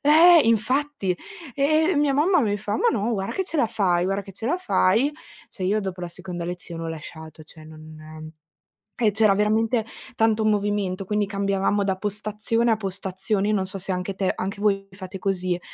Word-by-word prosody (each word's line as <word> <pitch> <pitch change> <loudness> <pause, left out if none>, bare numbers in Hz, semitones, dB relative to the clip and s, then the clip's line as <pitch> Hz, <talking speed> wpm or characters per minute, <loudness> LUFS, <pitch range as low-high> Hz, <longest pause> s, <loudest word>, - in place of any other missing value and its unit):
eh 325 +4 +7
infatti, 230 -1 +1 0.4
e 310 +5 +2
mia 290 -1 +2
mamma 325 +5 +3
mi 205 -5 +1
fa: 205 +1 -4
"Ma - - +3
no, 230 +1 0
guarda 195 -2 -3
che 380 - -1
ce 330 -3 -1
la 240 - +3
fai, 180 -5 +1
guarda 195 +2 -1
che 195 - -12
ce 220 +4 -6
la 325 +8 +1
fai." 270 - +2 0.4
Cioè, 190 - -9
io 200 +4 +2
dopo 190 -3 -4
la 175 - -4
seconda 175 -1 -6
lezione 175 -1 -6
ho - - -3
lasciato, 160 0 -9
cioè 155 0 -15
non 155 0 -11 0.6
e 225 -3 +2
c'era 210 -1 +4
veramente 220 +3 +1 0.3
tanto 220 -1 +2
movimento, 205 -3 0
quindi 210 +1 0
cambiavamo 200 0 0
da 190 -1 -1
postazione 210 +3 -1
a 225 - +3
postazione. 195 0 -2
Io 215 - +2
non 190 - 0
so 190 +1 -6
se 190 +1 -2
anche 180 +2 -2
te 190 0 0
anche 200 +2 -4
voi 195 -2 +1
fate 190 0 -8
così, 185 -2 -1
200 Hz, 190 wpm, -24 LUFS, 185-225 Hz, 0.6 s, eh